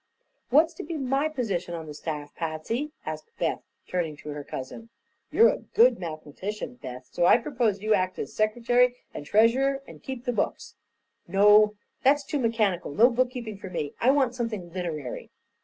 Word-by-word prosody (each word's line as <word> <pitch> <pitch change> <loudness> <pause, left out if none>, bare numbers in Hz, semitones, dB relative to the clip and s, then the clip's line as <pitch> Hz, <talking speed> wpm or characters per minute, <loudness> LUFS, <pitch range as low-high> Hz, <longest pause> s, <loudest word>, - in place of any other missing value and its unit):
"What's 315 +6 +4
to - - -7
be 320 +1 -4
my 275 +2 0
position 200 - -2
on 165 -1 -6
the 150 - -8
staff, 150 -1 -5
Patsy?" 170 - -3
asked 460 - -6
Beth, - - -1 0.3
turning 165 -5 -2
to 150 - -9
her 145 0 -5
cousin. 140 - -7 0.4
"You're 460 - +6
a - - -1
good 475 +3 +3
mathematician, 180 +8 -6
Beth, 125 -1 -8
so 175 - +2
I - - +7
propose 235 -6 -1
you 215 0 +3
act 185 -2 0
as - - -5
secretary 240 +3 +2 0.2
and 145 - -7
treasurer, 265 - +3
and - - -12
keep 260 -2 -7
the 245 - 0
books." - - -2 0.5
"No; 210 +3 +6 0.3
that's 285 +2 +4
too 295 - -2
mechanical; 215 - 0
no 235 - +5
bookkeeping 240 -4 -2
for 190 - -7
me. 150 -5 -3
I 245 - +4
want 265 -3 +3
something 215 -8 -4
literary." 160 -8 -4
215 Hz, 175 wpm, -27 LUFS, 170-250 Hz, 0.5 s, I